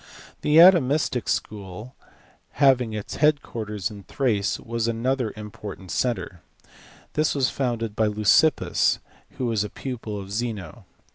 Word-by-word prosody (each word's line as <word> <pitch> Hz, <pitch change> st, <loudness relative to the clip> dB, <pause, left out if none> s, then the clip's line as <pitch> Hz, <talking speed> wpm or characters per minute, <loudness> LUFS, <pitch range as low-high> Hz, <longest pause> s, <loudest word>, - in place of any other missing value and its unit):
The 150 Hz, +1 st, +3 dB
Atomistic 155 Hz, -, +5 dB
School, 105 Hz, +4 st, -4 dB, 0.6 s
having 130 Hz, -5 st, +3 dB
its 105 Hz, -1 st, -5 dB
head 150 Hz, -1 st, +3 dB
quarters 105 Hz, -3 st, -4 dB
in 100 Hz, -1 st, -9 dB
Thrace, 110 Hz, -3 st, -1 dB
was 115 Hz, 0 st, -3 dB
another 120 Hz, +1 st, -1 dB
important 105 Hz, -3 st, -8 dB
centre. 95 Hz, -, -2 dB, 0.7 s
This 155 Hz, 0 st, +1 dB
was 135 Hz, -2 st, +1 dB
founded 115 Hz, -5 st, -2 dB
by 110 Hz, 0 st, +2 dB
Leucippus, 105 Hz, +7 st, +3 dB, 0.4 s
who 130 Hz, -, -2 dB
was 110 Hz, -3 st, +1 dB
a 105 Hz, -, -5 dB
pupil 115 Hz, -5 st, -6 dB
of 95 Hz, 0 st, -9 dB
Zeno. 110 Hz, -1 st, -4 dB
115 Hz, 130 wpm, -24 LUFS, 105-130 Hz, 0.7 s, Atomistic